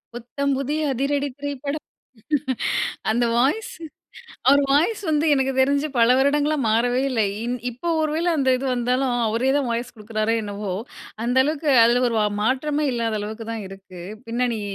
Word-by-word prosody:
புத்தம் 275 +4 -2
புதிய 280 +3 -2
அதிரடி 280 +2 0
திரைப்படம். 285 +1 -4 1.3
அந்த 240 +2 +2
வாய்ஸ்சு 315 - 0 0.7
அவரு 285 +1 +6
வாய்ஸ்சு 355 +9 +2
வந்து 305 +1 +2
எனக்கு 270 0 +1
தெரிஞ்சு 280 +3 +3
பல 230 -1 +5
வருடங்களா 290 +2 +2
மாறவே 240 +3 +2
இல்ல. 235 -4 0 0.2
இ - - -4 0.3
இப்ப 330 +8 -3
ஒரு 310 -1 0
வேள 335 +2 -1
அந்த 265 -2 +2
இது 265 - -5
வந்தாலும், 250 +1 0
அவரே 230 +4 +1
தான் 280 - 0
வாய்ஸ் 235 +1 -3
கொடுக்கிறாரே 215 +1 -1
என்னவோ? 205 -1 -4 0.5
அந்த 245 +2 0
அளவுக்கு 300 0 -1
அதில 245 +2 +3
ஒரு 230 - -2 0.2
மாற்றமே 290 +6 0
இல்லாத 225 -2 -1
அளவுக்கு 220 +2 -6
தான் 220 -3 -5
இருக்கு. 190 -2 -12 0.3
பின்னணி 235 -1 -1
255 Hz, 150 wpm, -23 LUFS, 230-285 Hz, 1.3 s, அவரு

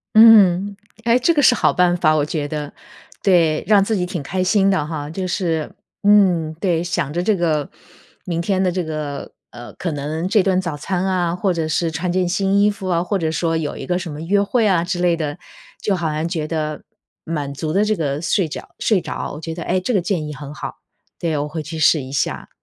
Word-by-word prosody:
嗯。 205 -3 +7 0.3
哎， 235 +1 +4
这 330 +7 +3
个 295 - +2
是 250 - +6
好 - - +3
办 180 -1 +3
法， 155 -3 +3
我 150 -2 +2
觉 150 -1 -3
得。 150 -1 -5 0.5
对， 170 -5 +3
让 205 -2 +5
自 215 0 0
己 180 - 0
挺 180 -4 -4
开 185 +6 -2
心 195 +1 +3
的 185 -7 +1
哈， 150 -2 -5
就 185 +3 -4
是 165 -4 -2 0.3
嗯， 185 -6 +4
对。 175 -4 +1
想 170 -5 -2
着 175 +3 -1
这 205 +2 +2
个 155 -5 0 0.6
明 170 -2 -2
天 190 +2 0
的 180 - +2
这 180 0 -2
个， 150 -3 -5 0.2
呃， 120 0 -10
可 175 - -4
能 155 +4 -3
这 210 0 +4
顿 185 -1 +2
早 170 -5 -4
餐 185 +5 -2
啊， 180 -2 0
或 190 +1 0
者 165 -3 -1
是 165 +1 0
穿 175 +2 -2
件 180 -1 +1
新 195 +2 +1
衣 210 0 +4
服 195 -2 -7
啊， 170 -1 +1
或 200 +2 -1
者 165 -4 -1
说 165 0 0
有 150 -2 -3
一 - - -7
个 180 0 0
什 170 -3 -6
么 150 +2 -7
约 200 +5 +2
会 225 +3 +1
啊 180 -5 +3
之 180 0 -3
类 175 -1 +2
的， 150 0 -3 0.4
就 205 - 0
好 165 -3 -2
像 155 +1 -2
觉 160 -4 -2
得 155 -2 -3 0.4
满 145 -4 -3
足 155 +2 -3
了 200 +2 +3
这 215 0 +1
个 145 -2 -2
睡 180 0 +1
觉 - - -8
睡 205 -5 +2
着， - - -5
我 150 - -8
觉 165 0 -5
得， 170 0 -6
哎， 185 - 0
这 185 +7 -2
个 200 - +3
建 175 -3 -1
议 150 - -6
很 145 +1 -8
好， - - -6 0.4
对， 160 -3 -1
我 145 +1 -2
会 155 +1 -5
去 160 +2 -6
试 155 0 +4
一 130 0 -9
下， 140 - -2
170 Hz, 250 characters per minute, -20 LUFS, 155-190 Hz, 0.6 s, 嗯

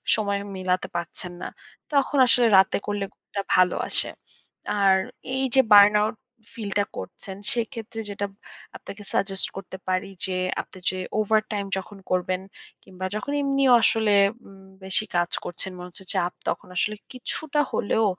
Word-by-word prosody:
সময় 200 -2 -1 0.2
মিলাতে 185 0 -1
পারছেন 175 +1 -4
না। - - -3 0.5
তখন 280 0 +2
আসলে 240 -1 +5
রাতে 190 0 +4
করলে 205 -1 -2
ঘুমটা 200 - -6
ভালো 185 -1 +4
আসে। - - +2 0.7
আর 195 -1 +5 0.4
এই 265 - 0
যে 265 - +8
burn 205 0 +9
out 215 +1 0 0.4
feel 215 -3 -5
টা - - +4
করছেন, 190 -2 -7 0.2
সেক্ষেত্রে 230 -2 -4
যেটা 205 0 -3 0.5
আপনাকে 205 +1 -10
suggest 195 -1 +4
করতে 190 -1 -7
পারি 185 +1 0 0.2
যে, 185 -1 -2 0.3
আপনি - - -15
যে 185 - -4 0.2
overtime 215 -1 0
যখন 200 +1 -7
করবেন 185 0 0 0.4
কিংবা 185 0 -7
যখন 215 +7 -3
এমনিও 275 -2 +3
আসলে 220 -2 +3 0.3
উম 195 -1 -15 0.2
বেশি 190 +3 +2
কাজ 175 0 +1
করছেন, 185 +2 -3
মনে 180 0 -8
হচ্ছে 180 - -8
যে - - -11
চাপ, 175 +1 0
তখন 195 - -2
আসলে 210 +4 0 0.2
কিছুটা 295 +4 -3
হলেও 220 +2 +1
200 Hz, 155 wpm, -25 LUFS, 185-220 Hz, 0.7 s, burn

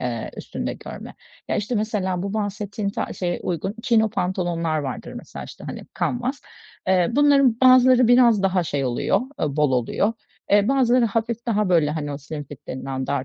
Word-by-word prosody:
eee, 120 -3 -3
üstünde - - -4
görme. - - -9 0.3
Ya, - - 0
işte, 220 +4 -2
mesela 200 -4 -1
bu 200 +2 -4
bahsettiğin 205 -1 -3
ta - - -4
şeye 175 -1 -3
uygun 180 +4 -3
Chino 220 -3 +3
pantolonlar 175 -5 -1
vardır 135 -3 -5
mesela, - - -8
işte, - - -11
hani - - -7
kanvas. 250 +3 -2 0.5
Eee, 185 -2 +3
bunların 275 -4 +4
bazıları 255 -1 +6
biraz 240 -4 +5
daha 190 -2 +2
şey 145 -3 -2
oluyor, 125 +9 +1 0.2
eee, 150 -1 -1
bol 150 -3 +2
oluyor. 125 - +1 0.4
Eee, 205 +2 +4
bazıları 255 -3 +3
hafif 230 +2 -2
daha 210 -4 +1
böyle 165 -4 +3
hani 150 -2 -3
o 140 - -5
"slim 145 +1 -7
fit" 140 -1 -13
denilen 130 0 -4
dar 140 -2 -1
195 Hz, 175 wpm, -23 LUFS, 155-230 Hz, 0.5 s, bazıları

